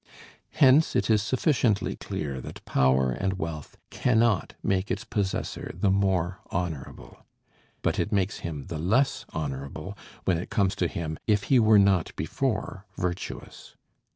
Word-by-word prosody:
Hence 145 +2 +5
it - - +2
is 105 -1 +4
sufficiently 125 - +1
clear 70 -4 -4
that - - -10
power 65 -1 +3
and 95 +8 -1
wealth 80 -4 -6
cannot 115 -5 +2
make 95 +1 0
its - - -2
possessor 100 -2 -3
the 100 - +2
more 95 -2 +1
honorable. 85 -6 -5 0.6
But - - +1
it - - -1
makes 100 -1 0
him 75 -5 -5
the 80 - -5
less 115 - +1
honorable, 70 -3 -5 0.3
when 85 -3 +2
it 90 - -6
comes 95 -2 +2
to 90 - +1
him, 80 -2 -4
if 105 -2 +3
he 130 - +7
were 110 -2 +6
not 100 -4 +3
before 105 - -2
virtuous. 90 0 -5
95 Hz, 145 wpm, -27 LUFS, 80-105 Hz, 0.6 s, he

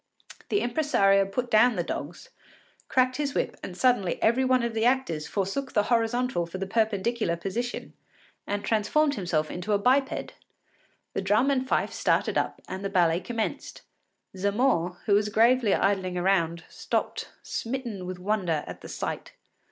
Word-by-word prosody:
The 410 - +1
impresario 235 -8 +3
put 245 +5 -3
down 235 +2 +5
the 175 - 0
dogs, 165 0 -6 0.6
cracked 255 0 +2
his 285 -2 -2
whip, - - -1
and 180 - -7
suddenly 245 -8 +2
every 235 +4 +3
one 255 -1 +3
of 235 -1 -1
the 220 0 0
actors 235 -12 +1
forsook 205 - -2
the 210 - +3
horizontal 230 -5 +1
for 170 - -6
the 195 - -3
perpendicular 215 -2 0
position, 230 +8 -4 0.5
and 205 0 -2
transformed 280 +7 +2
itself 160 -4 -1
into 180 +4 -2
a - - +4
biped. 265 +6 +1 0.8
The - - -1
drum 210 +8 +3
and 260 -1 0
fife - - 0
started - - +1
up - - -1
and 190 +1 -6
the 195 - -1
ballet 175 -3 +3
commenced. 225 +2 -4 0.5
Zamore, 200 -3 +1
who 210 - +2
was 210 +1 +3
gravely 230 0 +4
idling 190 -2 0
around, 170 -3 +1
stopped - - -3
smitten 230 -6 -4
with 185 0 -5
wonder 180 -5 -1
at - - -9
the - - -10
sight. - - -5
210 Hz, 160 wpm, -27 LUFS, 185-245 Hz, 0.8 s, down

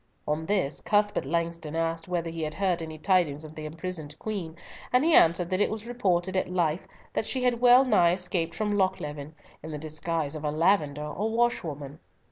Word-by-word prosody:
On 155 +2 -1
this, 190 -8 0
Cuthbert 205 -7 +1
Langston 165 -1 -2
asked 165 0 -1
whether 170 -2 -2
he 165 0 -5
had 155 0 -3
heard 185 -3 0
any 160 -1 -6
tidings 155 -3 +1
of 155 - -10
the 155 0 -7
imprisoned 155 -2 -6
Queen, 190 -7 -5 0.4
and 250 +4 +3
he 330 - +4
answered 170 - +5
that 185 +2 +1
it - - +3
was 220 0 -5
reported 190 -7 0
at 185 - 0
Leith 170 -2 0 0.3
that 220 - -1
she 260 -1 -1
had 245 -1 +1
well 250 +2 +7
nigh 175 -9 +4
escaped 180 -2 -2
from 210 -1 -1
Lochleven, 150 -6 -2 0.3
in 160 - -8
the 150 - -4
disguise 155 0 -2
of 155 -1 -6
a 150 - 0
lavender 150 -2 +1
or 195 +9 -2
washerwoman. 160 - -1
170 Hz, 195 wpm, -27 LUFS, 155-200 Hz, 0.4 s, well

